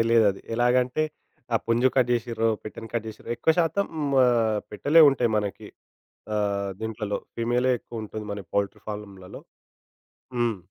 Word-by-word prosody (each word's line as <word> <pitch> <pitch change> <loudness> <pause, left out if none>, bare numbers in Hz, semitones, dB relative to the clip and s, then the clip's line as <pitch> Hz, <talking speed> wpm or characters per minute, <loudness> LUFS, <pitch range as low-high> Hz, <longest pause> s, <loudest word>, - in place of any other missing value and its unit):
తెలీయదది. 115 -4 +3
ఎలాగంటే, 125 +4 +2 0.5
ఆ - - +6
పుంజు 120 +3 +3
కట్ 125 -2 +4
జేసిర్రో, 115 -1 0 0.2
పెట్టెని 115 +1 -8
కట్ 115 -2 -1
చేసిర్ర 110 - -11
ఎక్కువ 160 - +3
శాతం 175 +4 +2 0.4
ఆహ్, 115 -3 +2
పెట్టలే 145 +10 +5
ఉంటాయి 125 -3 +1
మనకి. 100 -2 -3 0.7
ఆహ్, 100 -1 0
దీంట్లలో 110 -2 -3 0.2
ఫీమేలే 120 +2 +1
ఎక్కువుంటది 110 -2 -7
మన 100 -1 -6
పౌల్ట్రీ 100 -1 -1
ఫార్లమ్‌లలో. 100 -1 -8 1.0
హ్మ్. 120 -3 +1
115 Hz, 130 wpm, -26 LUFS, 105-120 Hz, 1.0 s, ఆ